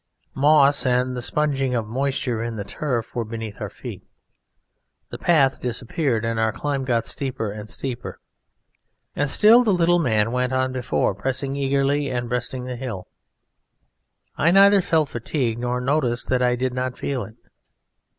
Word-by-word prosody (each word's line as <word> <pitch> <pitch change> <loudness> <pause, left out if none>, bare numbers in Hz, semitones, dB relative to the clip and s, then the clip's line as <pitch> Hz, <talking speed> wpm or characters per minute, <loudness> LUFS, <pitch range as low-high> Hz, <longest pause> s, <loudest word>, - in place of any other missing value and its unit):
Moss 145 0 +4
and 125 0 +1
the 125 - -4
sponging 135 -1 0
of 115 -2 -1
moisture 130 -1 -1
in 115 0 -4
the 105 - -4
turf 120 0 -3
were 120 - -1
beneath 110 -1 -7
our - - -3
feet, - - -9 1.1
the - - -7
path 140 -6 +3
disappeared, 120 0 -1
and 115 0 -1
our 110 0 +2
climb 140 +2 -3
got 115 -3 0
steeper 130 -6 -3
and 105 +1 -8
steeper; 125 0 -5 1.0
and 145 -1 0
still 225 - +6
the 220 - +2
little 175 -1 +3
man 110 -7 +1
went 125 +1 0
on 130 0 +1
before, 125 -5 0
pressing 135 +6 -3
eagerly 140 +1 +1
and 120 -2 -3
breasting 125 +1 -3
the 125 0 -5
hill. 110 -8 -6 1.3
I 165 - +3
neither 195 +2 +6
felt 160 -4 +1
fatigue 120 -1 -2
nor 125 +1 -1
noticed 125 -2 0
that 125 -1 +2
I 125 -1 +3
did 130 +1 -2
not 125 0 -3
feel 135 -3 -2
it. 110 - -11
125 Hz, 160 wpm, -23 LUFS, 120-140 Hz, 1.3 s, still